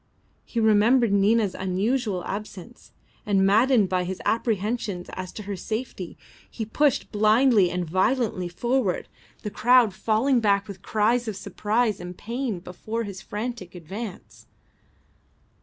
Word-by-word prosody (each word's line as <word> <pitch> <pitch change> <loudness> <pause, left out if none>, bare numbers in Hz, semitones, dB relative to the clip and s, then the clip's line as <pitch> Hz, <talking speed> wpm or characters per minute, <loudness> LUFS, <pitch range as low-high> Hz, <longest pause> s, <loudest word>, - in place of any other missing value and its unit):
He 235 - -3
remembered 220 +1 +4
Nina's 205 0 +3
unusual 195 +1 -1
absence, 210 +2 -8 0.3
and 195 -2 +2
maddened 220 +2 +4
by 185 -1 0
his 185 +1 -5
apprehensions 215 -4 -1
as 185 -1 -6
to 210 - -7
her 200 0 -4
safety, 215 -2 -5 0.3
he 225 - -5
pushed 280 +5 +1
blindly 215 -1 +4
and 180 -1 -3
violently 190 0 0
forward, 240 +2 -1 0.4
the 210 - -4
crowd 240 0 +4
falling 230 +6 +2
back 200 -2 +2
with 195 -2 -9
cries 230 +3 +1
of 215 - -3
surprise 215 +2 -1
and 180 0 -8
pain 235 -2 -3
before 215 +6 -5
his 200 -3 -7
frantic 210 -4 -6
advance. 190 +4 -8
210 Hz, 130 wpm, -25 LUFS, 190-235 Hz, 0.4 s, remembered